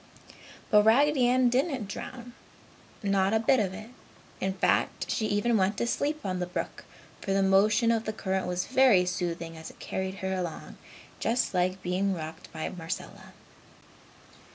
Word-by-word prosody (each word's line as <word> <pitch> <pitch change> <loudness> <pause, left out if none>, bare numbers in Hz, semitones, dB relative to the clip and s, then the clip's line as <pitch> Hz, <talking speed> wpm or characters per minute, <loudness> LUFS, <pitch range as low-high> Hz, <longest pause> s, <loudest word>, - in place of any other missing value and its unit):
But 210 -1 +7
Raggedy 255 +4 +4
Ann 255 0 +4
didn't 260 - 0
drown 240 +4 -8 0.7
not 195 +1 +2
a - - +3
bit 250 +4 +3
of 195 -4 0
it. 215 +5 -9 0.5
In 190 0 -1
fact, 190 - 0
she 215 - 0
even 215 +3 +2
went 195 +1 +1
to - - 0
sleep 295 +5 -1
on 185 -1 -2
the 180 - -2
brook, 180 - -5 0.4
for 195 - -1
the 195 0 +3
motion 210 +4 +4
of 225 -1 0
the 215 - -1
current 190 -3 -2
was 180 0 -1
very 255 -8 +5
soothing 170 -2 -3
as 160 0 -9
it - - -16
carried 190 0 -4
her 190 - -1
along 175 -4 -5 0.4
just 235 -1 0
like 185 +1 0
being 190 +2 0
rocked 160 0 -8
by 160 -1 -4
Marcella. 165 -1 -7
195 Hz, 165 wpm, -28 LUFS, 180-235 Hz, 0.7 s, But